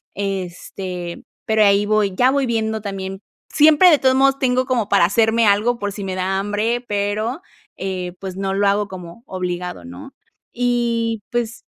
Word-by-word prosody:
este, 185 -2 -5 0.2
pero 220 -1 +3
ahí 200 0 +4
voy. 210 -2 +1
Ya 250 +6 +4
voy 280 -1 +1
viendo 220 -2 -1
también, 195 -1 -6 0.3
siempre 310 +4 +6
de 300 - +5
todos 260 -1 +3
modos, 275 +1 +3
tengo 255 -1 +1
como 240 -5 -1
para 195 -4 +5
hacerme 225 +4 +2
algo 210 +4 +3
por 205 -2 -3
si 200 - -6
me 190 -1 -4
da 190 +1 -1
hambre, 210 +4 -1
pero, 210 +7 -2 0.4
eh, 185 -2 -4
pues 190 -2 -6
no 195 0 -2
lo 200 +1 +2
hago 205 +1 +1
como 180 +3 -10
obligado, 180 - -4
¿no? 90 +1 -10 0.4
Y 235 -2 0
pues 235 -1 -3
205 Hz, 170 wpm, -20 LUFS, 190-235 Hz, 0.4 s, siempre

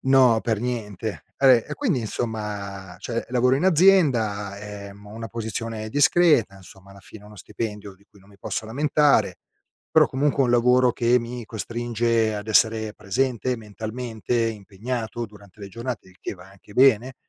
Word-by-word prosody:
No, 130 -4 +4
per 110 -3 -1
niente. 110 -4 -4
Vabbè, 130 -4 +5
e - - -5
quindi, 205 - 0
insomma 105 -4 -5
cioè 115 -1 -4
lavoro 125 +1 +3
in 150 - -1
azienda, 130 - +3
ehm, 100 0 -10
ho 105 - -12
una 115 0 -6
posizione 115 -1 -5
discreta, 145 - +3
insomma, 95 0 -16
alla 100 0 -14
fine 105 +1 -14
uno 105 0 -14
stipendio 105 0 -6
di 100 +2 -26
cui 100 - -21
non 100 - -22
mi 100 - -19
posso - - -4
lamentare, 145 +4 +2 0.5
però - - +5
comunque 140 +2 -1
è - - +2
un - - 0
lavoro 125 +1 +4
che 120 +1 +2
mi 120 0 -6
costringe 115 0 -1
ad 105 +1 -7
essere 110 0 +2
presente 125 +4 -1
mentalmente, 110 +2 -5
impegnato 110 +3 -5
durante 100 -1 -18
le 100 - -7
giornate, 115 0 -6
il 95 - -20
che - - -5
va 95 0 -15
anche 100 +1 -18
bene, 130 -1 +4
115 Hz, 165 wpm, -24 LUFS, 105-125 Hz, 0.5 s, Vabbè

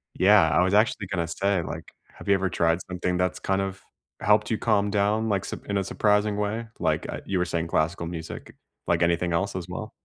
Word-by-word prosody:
Yeah, 95 -3 +6
I 80 +2 +3
was 95 +2 +2
actually 105 -2 +2
gonna 90 -3 -2
say, 95 +2 0
like, - - -6 0.3
have - - -12
you 100 - +6
ever 95 -1 +1
tried 85 0 +2
something 90 0 -1
that's 90 0 0
kind 95 0 0
of 95 0 -4 0.4
helped 105 +1 +3
you 110 - 0
calm 105 -3 +2
down, 105 +2 +1
like, 100 -3 0
sup - - -7
in 100 - -2
a 95 - -1
surprising 105 +1 +1
way? 105 +3 -2
Like, - - 0
uh, - - -5
you 95 - 0
were 90 - +2
saying 85 -1 -2
classical 85 +2 0
music, 80 -1 -7 0.3
like, 85 0 +1
anything 85 0 +1
else 100 +4 0
as 90 -1 -4
well? 110 +4 -6
95 Hz, 220 wpm, -26 LUFS, 85-105 Hz, 0.4 s, Yeah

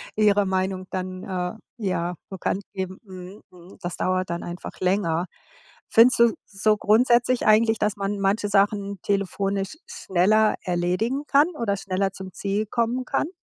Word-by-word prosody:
ihre 205 -1 +3
Meinung 190 0 -1
dann, 185 0 -4
äh, 180 -1 -3 0.3
ja 180 -2 -1 0.2
bekannt 190 +1 -2
geben. 190 -1 -5
Mhm, 185 0 -11
mhm, 180 +1 -16
das 175 0 -5
dauert 185 -1 0
dann 170 0 -3
einfach 175 +1 -8
länger. 180 -3 +1 0.6
Findest 235 +3 +6
du 235 -1 +5
so 210 +1 +1
grundsätzlich 240 +3 +3
eigentlich, 220 +1 +4
dass 210 -1 0
man 200 +1 -2
manche 200 +2 +1
Sachen 200 0 +1
telefonisch 200 +3 -1
schneller 210 +4 +2
erledigen 185 +10 -1
kann 285 +3 +5
oder 200 -4 0
schneller 195 0 -1
zum 190 -1 -9
Ziel 200 +3 -2
kommen 235 +3 -1
kann? - - 0
195 Hz, 150 wpm, -24 LUFS, 185-215 Hz, 0.6 s, Findest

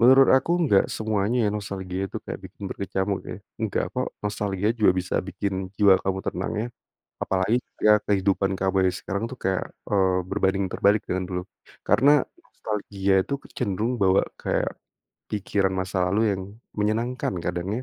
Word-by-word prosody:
Menurut 130 +3 +7
aku 130 +5 +3
enggak 100 -9 +4
semuanya 110 +2 0
ya 105 - +3
nostalgia 95 -2 -4
itu - - -6
kayak - - -6
bikin 100 - -10
berkecamuk 95 0 -2
ya. - - -5 0.2
Enggak, - - 0
kok. - - -1 0.2
Nostalgia 105 0 -1
juga 110 -5 +4
bisa 90 0 -2
bikin 95 -1 -3
jiwa 100 -2 +6
kamu 95 0 -1
tenang 90 - -2
ya, 110 +3 -1 0.6
apalagi 95 +5 +1 0.2
ya 105 0 +6
kehidupan 100 -1 +2
kamu 95 0 0 0.2
yang - - -7
sekarang 100 +2 -3
tuh 130 - -8
kayak, 95 0 0 0.2
eee, 95 -2 +3
berbanding 95 -1 +1
terbalik 100 +3 +3
dengan 95 0 -1
dulu. 90 -1 -2 0.5
Karena 140 +2 +5 0.3
nostalgia 100 -2 -2
itu 140 - -4
kecenderung 105 +5 -2
bawa 95 -2 +4 0.2
kayak, - - -1 0.5
pikiran 100 -2 0
masa 95 -1 0
lalu 100 +4 +1
yang 95 -1 -2 0.4
menyenangkan 110 +1 0
kadang 90 +7 -2
100 Hz, 155 wpm, -25 LUFS, 95-105 Hz, 0.6 s, Menurut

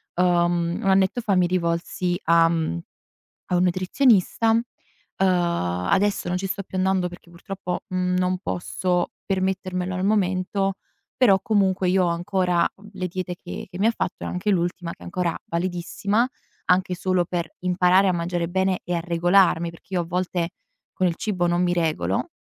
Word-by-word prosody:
uhm, 175 -1 +2
1 195 - +1
annetto 190 +4 +3
fa 205 -4 +1
mi 180 -1 +3
rivolsi 175 0 -1
a, 165 0 +5
mhmm, 160 - -1 0.7
a 180 - 0
un 180 - +3
nutrizionista. 195 +4 +3
Uhm, 225 +1 +3 0.6
adesso 175 - +1
non 180 - 0
ci 195 +1 -3
sto 195 +1 -3
più 190 - -7
andando, 185 -1 +1
perché 175 0 -13
purtroppo, 180 +1 -5
mhmm, 180 0 0
non 185 0 +1
posso 180 -1 -1
permettermelo 185 -1 -1
al 185 - -2
momento, 195 -1 +1 0.4
però, 200 -7 +5
comunque, 195 -5 +1
io 185 0 +3
ho - - +1
ancora, 180 0 +1
uhm, 205 +2 -15
le 185 -2 -3
diete 180 0 -4
che - - -7
che 180 - -8
mi 210 - +3
ha - - +4
fatto 190 -5 -4
e - - -3
anche 180 +4 -2
l'ultima, 175 -1 -1
che - - -12
è - - -13
ancora 175 -1 -1
validissima, 185 +6 -1 0.4
anche 185 0 +2
solo 185 0 +1
per 170 -2 -3
imparare 180 +1 +3
a - - +2
mangiare 170 0 -2
bene 190 +1 +1
e 175 - -3
a - - 0
regolarmi, 175 0 +3
perché 170 +3 -14
io 175 - +2
a - - -5
volte 180 -1 -1 0.4
con 185 - +1
il 170 - -1
cibo 180 -3 -1
non 175 +1 +1
mi 175 - +2
regolo. 155 - -1
180 Hz, 175 wpm, -24 LUFS, 175-190 Hz, 0.7 s, a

